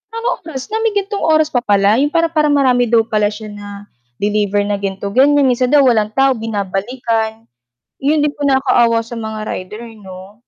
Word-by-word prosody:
"Anong 470 +2 -2
oras 265 -4 -6
na, 440 - -1
may 450 -2 0
gantong 400 0 -2
oras 310 -1 +3
pa 245 - +1
pala." 205 +1 +2
'yong 290 +1 +1
para 330 0 +2
para 305 -2 +2
marami 255 -4 +2
daw 225 0 +3
pala 215 -2 0
siya 210 0 -7
na 205 0 -10 0.5
deliver 205 -1 0
na 205 -1 -2
ganito- 200 0 -4
ganyan, 280 +4 +4
minsan 250 0 +1
daw 290 -2 +5
walang 220 -4 +2
tao 270 0 +3
binabalikan. 220 +2 -3 0.5
'Yon 295 +2 +1
din 295 - +1
po 290 -1 -3
nakaawa 245 -4 +2
sa 230 +1 -8
mga 220 -1 -5
rider 210 +5 -7 0.2
'no. 190 +2 -12
230 Hz, 190 wpm, -16 LUFS, 210-285 Hz, 0.5 s, daw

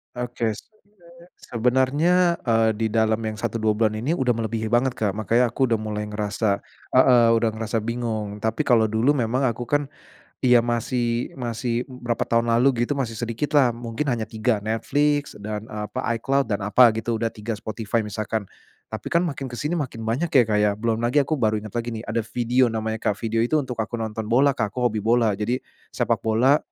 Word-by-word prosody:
Oke. 120 -2 -2
Sebe - - -13 0.8
sebenernya, 145 +9 +2
eee, 115 -1 +3
di 110 0 0
dalam 110 -1 +2
yang 110 - -2
1, 115 -1 -2
2 110 -1 +1
bulan 110 0 +1
ini 130 +10 -1
udah 125 -7 +1
melebihi 110 -1 -2
banget, 120 +2 +2
Kak. 105 -2 -2
Makanya 115 +3 +2
aku 130 +4 +1
udah 115 -3 +1
mulai 105 -1 -3
ngerasa 105 -1 -1 0.3
heeh, 125 -2 +6
udah 115 0 +2
ngerasa 110 0 -2
bingung. 110 -3 -3
Tapi 110 +2 -1
kalau 115 -3 +4
dulu 115 +7 +2
memang 125 +2 0
aku 120 +1 -4
kan 145 +1 0 0.5
iya 125 -1 +6
masih 120 0 -1
masih 120 0 -2
b 125 -2 -12
berapa 120 -1 -1
tahun 115 0 +1
lalu 120 +1 +3
gitu 140 +3 -1
masih 115 -4 -2
sedikit 120 +6 -3
lah. 135 -4 +5
Mungkin 120 +4 -3
hanya 115 -3 -1
3, 110 0 0
Netflix 145 +6 0
dan 105 +1 -6
apa, 105 0 -4 0.2
iCloud 135 +2 0
dan 100 -1 -1
apa 120 +3 +6
gitu, 115 +1 -2
udah 115 0 -1
3 110 +1 -5
Spotify 110 +1 -2
misalkan. 110 +1 -3 0.5
Tapi - - -7
kan 170 - +2
makin 140 -6 -3
ke 120 - -8
sini 150 +8 -2
makin 125 -6 -4
banyak 120 +10 0
ya, 130 - +8
Kak, 105 -2 0
ya 105 -1 +2
belum 110 +1 -1
lagi 120 +5 +2
aku 150 +1 -2
baru 110 -2 +1
inget 110 - -8
lagi 120 0 -3
nih, 110 - -5
ada 115 -1 -3
Vidio 125 +2 +2
namanya, 110 -1 -2
Kak. 105 - 0
Vidio 115 0 -1
itu 120 +7 +1
untuk 130 -5 -1
aku 110 +1 -3
nonton 110 -1 -3
bola, 130 +5 +4
Kak, 105 -6 -2
aku 125 - -2
hobi 110 - -3
bola. 115 +1 +2
Jadi 120 +4 -1 0.3
sepak - - +1
bola, 125 +7 +4
115 Hz, 200 wpm, -23 LUFS, 110-125 Hz, 0.8 s, ya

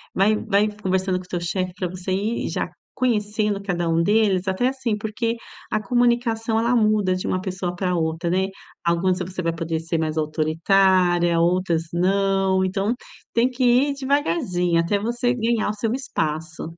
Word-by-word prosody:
Vai 205 +3 +4
vai 210 -1 +2
conversando 190 -1 0
com 180 - -11
o - - -21
teu 175 - -2
chefe 180 +1 -2
para 180 - -1
você 185 +1 -5
ir 210 +5 -1
já - - -2 0.3
conhecendo 210 -4 0
cada 175 -3 -1
um 165 +1 +2
deles, 200 -2 +2
até, 190 +7 +1
assim, 260 -5 -1
porque 225 +2 -2 0.3
a 215 - +1
comunicação, 235 -1 +1
ela 235 +2 +2
muda 215 -4 +2
de 185 - -4
uma 185 - 0
pessoa 185 -2 -3
para 180 0 -1
outra, 165 +1 -1
né. 190 +1 +1 0.4
Algumas 180 +2 +1
você 185 +1 -4
vai 165 0 0
poder 165 -1 -2
ser 165 0 -2
mais 155 0 -2
autoritária, 175 +3 +2
outras 175 -1 +1
não. 190 +1 +2
Então 195 +5 0 0.4
tem 235 +2 +3
que 255 0 -3
ir 255 +4 +4
devagarzinho 180 - +1
até 170 +5 +1
você 240 +3 0
ganhar 230 -2 0
o 210 - -1
seu 220 +2 -1
espaço. 160 - -3
190 Hz, 170 wpm, -23 LUFS, 175-220 Hz, 0.4 s, Vai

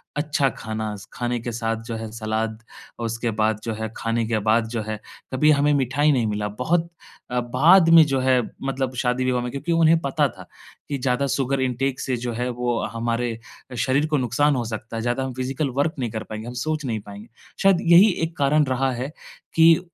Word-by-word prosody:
अच्छा 145 -2 +1
खाना, 110 -2 -5 0.2
खाने 120 0 -2
के 120 - -4
साथ 115 0 -2
जो 115 0 -5
है 110 -1 -6
सलाद 110 0 -2 0.4
और 115 - -2
उसके 115 +1 -2
बाद 110 0 0
जो 115 - -2
है, 110 0 -4
खाने 115 0 -1
के 110 -1 0
बाद 110 +2 +2
जो 115 -1 -2
है 110 -1 -3 0.3
कभी 150 +4 +4
हमें 145 0 +3
मिठाई 140 +2 +2
नहीं 125 -5 +1
मिला। 105 0 -2
बहुत 160 +11 -1 0.4
अ, 125 - +1
बाद 155 +9 +5
में 165 -1 +9
जो 135 -2 0
है 130 -1 +3 0.2
मतलब 135 -1 -2
शादी-विवाह 125 0 0
में 125 - -4
क्योंकि 140 +6 -4
उन्हें 165 0 +4
पता 140 -4 +1
था - - -12 0.4
कि 140 - -1
ज़्यादा 125 +1 0
शुगर 135 0 0
इंटेक 130 +1 -1
से 130 - -1
जो 120 0 -3
है 125 +2 -2
वो 120 -1 -1
हमारे 115 0 -1 0.4
शरीर 135 +5 +2
को 155 -1 +1
नुकसान 135 +3 +2
हो 125 - -1
सकता 110 +1 -6
है। - - -2
ज़्यादा 120 +3 -1
हम 130 -1 -4
फ़िज़िकल 130 +3 -2
वर्क 150 +3 +2
नहीं 120 - -1
कर 110 - -4
पाएँगे, 110 +1 -7
हम 120 - -6
सोच 155 +4 -2
नहीं 115 -4 -2
पाएँगे। 100 +2 -11 0.4
शायद 195 -2 +6
यही 175 +5 +7
1 165 0 -3
कारण 145 +2 +3
रहा 130 0 0
है 130 +4 -4 0.4
कि 165 0 +7
अ, - - -3
125 Hz, 210 wpm, -23 LUFS, 115-140 Hz, 0.4 s, में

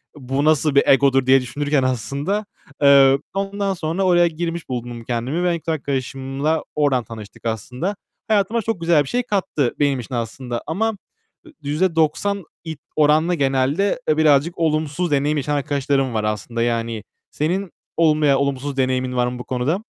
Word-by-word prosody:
"Bu 135 +1 -2
nasıl 155 -1 +2
bir 140 - +6
egodur?" 135 -1 +4
diye 130 0 +5
düşünürken 145 +2 -1
aslında. 140 - -2 0.4
Eee, 140 -1 +6
ondan 195 0 -1
sonra 170 +2 -2
oraya 175 -2 +4
girmiş 165 -1 -4
buldum 120 -1 -5
kendimi 125 +8 -2
ve 170 -2 +1
kız 165 - -7
arkadaşımla 135 +2 -2
oradan 140 -5 +2
tanıştık 110 0 -11
aslında. 125 - -3 0.3
Hayatıma 220 +2 +1
çok 220 -6 -3
güzel 165 -3 +3
bir - - -11
şey 245 0 0
kattı 180 - -1
benim 140 -3 +2
için 125 +1 -6
aslında 120 +1 -4
ama 220 +7 0 0.5
ü 325 - -14 0.2
%90 170 +4 +1 0.2
i 160 - -4 0.2
oranla 155 +3 +3
genelde, 140 - +1
eee, 155 - +3
birazcık 155 +2 +3
olumsuz 155 +1 0
deneyim 145 +2 +1
yaşayan 145 +1 -1
arkadaşlarım 140 -2 0
var 110 -1 -1
aslında. 105 +2 -3
Yani 115 -2 -2 0.3
senin 180 +5 -2 0.3
olumlu 155 -2 +3
veya 140 -2 +4
olumsuz 140 0 -2
deneyimin 130 -1 0
var 125 0 +2
mı 125 0 -5
bu - - -5
konuda? 130 +7 -1
145 Hz, 160 wpm, -21 LUFS, 130-165 Hz, 0.5 s, bir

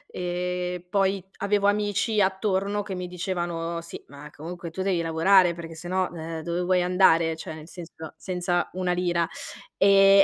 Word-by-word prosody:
e 180 0 -2
poi 195 -2 +2
avevo 200 0 +1
amici 205 +1 +1
attorno 195 +1 0
che 200 -1 -6
mi 180 0 -4
dicevano: 175 -2 -3
"Sì 170 - -9
ma 145 +1 -11
comunque 170 +2 -7
tu 180 +4 -5
devi 185 -3 +1
lavorare 170 +2 +4
perché 165 -1 -8
se 170 +2 -8
no, 185 0 0
ehm, 165 -1 -5
dove 170 +1 -2
vuoi 180 0 +2
andare? 170 -3 +4
Cioè, 160 0 -7
nel 155 0 -11
senso, 165 -3 -9
senza 180 -1 -1
una 180 0 -1
lira", 175 -2 +1 0.5
e 195 0 +7
180 Hz, 165 wpm, -26 LUFS, 170-190 Hz, 0.5 s, e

